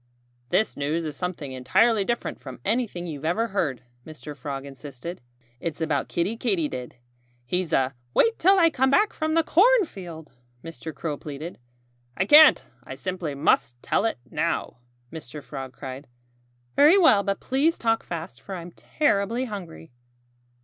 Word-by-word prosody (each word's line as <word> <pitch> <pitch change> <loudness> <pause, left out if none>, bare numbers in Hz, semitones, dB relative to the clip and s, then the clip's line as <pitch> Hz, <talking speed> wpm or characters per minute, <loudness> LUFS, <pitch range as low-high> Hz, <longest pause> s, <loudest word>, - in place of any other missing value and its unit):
"This 220 - +1
news 155 +4 -1
is 150 -2 -5
something 175 -6 -4
entirely 200 - +3
different 240 +4 -3
from 130 -4 -9
anything 215 -6 -1
you've 150 -4 -6
ever 215 +9 0
heard," 145 -11 -1 0.2
Mr. 150 -1 -9
Frog 140 -1 -6
insisted. 140 +4 -8 0.4
"It's 165 +1 -4
about 155 -4 0
Kiddie 190 +7 -1
Katydid. 160 - -2 0.5
He's 180 +5 -1
a 135 0 +2
" 120 0 -40
"Wait 460 0 +3
till 385 +3 +5
I 335 -3 +5
come 265 -2 +2
back 415 +10 +3
from 315 0 -1
the 330 - +4
cornfield!" 310 - +2 0.3
Mr. 165 -1 -7
Crow 150 +1 -4
pleaded. 150 +4 -8 0.6
"I 190 - +1
can't! 300 +7 +8 0.2
I - - -8
simply 180 -6 -4
must 140 -4 +2
tell - - +1
it 225 - 0
now!" - - -1 0.4
Mr. 150 -2 -8
Frog 135 0 -7
cried. 135 +1 -8 0.7
"Very 305 +7 +7
well! 320 - +6
But 200 -1 -2
please 285 +6 +1
talk 225 -1 +1
fast; 160 -7 -7
for 190 - -7
I'm 175 0 -8
terribly 230 - 0
hungry." 180 - -8
170 Hz, 155 wpm, -25 LUFS, 145-230 Hz, 0.7 s, can't